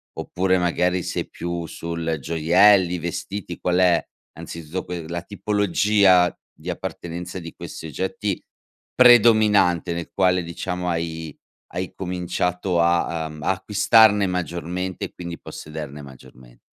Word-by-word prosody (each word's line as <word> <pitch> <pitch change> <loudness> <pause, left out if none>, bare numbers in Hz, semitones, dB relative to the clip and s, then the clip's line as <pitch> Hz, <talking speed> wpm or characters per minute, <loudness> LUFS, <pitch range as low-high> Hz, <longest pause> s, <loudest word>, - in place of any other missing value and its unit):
oppure 95 0 0
magari 90 +1 +1
sei - - -3
più 85 -1 -5
sul, 80 0 -4
gioielli, 90 +4 +4
vestiti; 85 +2 -5
qual 90 0 0
è, 90 -2 +3 0.3
anzitutto 85 +2 -7
que 85 -2 -6
la 85 +1 -4
tipologia 100 -2 +3 0.2
di - - -9
appartenenza 90 +2 -5
di 85 -1 -9
questi - - -8
oggetti, 95 +5 -3 0.5
predominante 110 -8 +5
nel 85 0 -6
quale 90 -2 +2
diciamo 90 +1 -4
hai 80 -2 -4 0.4
hai 90 +1 -4
cominciato 90 -1 -1
a, 85 -1 +1
uhm, 75 -1 -10
a - - +2
acquistarne 105 +1 +4
maggiormente, 90 +1 -3
e - - -10
quindi 85 -1 -7
possederne 75 -2 -8
maggiorme 65 -3 -15
90 Hz, 120 wpm, -23 LUFS, 85-95 Hz, 0.5 s, predominante